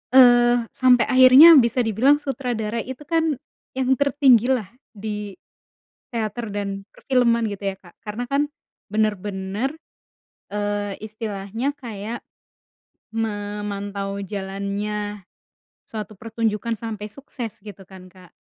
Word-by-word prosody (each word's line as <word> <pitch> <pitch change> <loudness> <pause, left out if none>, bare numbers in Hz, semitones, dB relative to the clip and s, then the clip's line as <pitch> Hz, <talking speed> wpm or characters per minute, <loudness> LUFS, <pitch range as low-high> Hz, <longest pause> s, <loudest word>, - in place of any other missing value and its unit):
eee, 240 -1 +7
sampai 250 -2 +4
akhirnya 260 +6 +9
bisa 235 +1 +2
dibilang 235 +7 +4
sutradara 240 -6 -3
itu, 260 +3 -8
kan, 325 -3 +1 0.4
yang 260 0 +1
tertinggi 270 -4 +4
lah 225 -7 0 0.3
di 210 -1 -5 0.8
teater, 230 0 -3
dan 200 -1 -4
perfilman 235 -3 +1
gitu, 200 0 -7
ya, 195 - -2
Kak. 175 - -18
Karena 215 +3 -4
kan, 290 +1 +2 0.4
benar-benar, 210 +4 -1 0.8
eee, 205 -1 -2
istilahnya 215 +4 -4
kayak 225 -3 -7 0.9
memantau 205 -2 -3
jalannya 200 +1 -4 0.6
suatu 215 -1 -7
pertunjukan 225 0 -2
sampai 215 -2 -5
sukses, 235 -3 -7
gitu, 205 -2 -11
kan, 190 -1 -13
Kak. 180 -2 -17
215 Hz, 105 wpm, -23 LUFS, 205-245 Hz, 0.9 s, akhirnya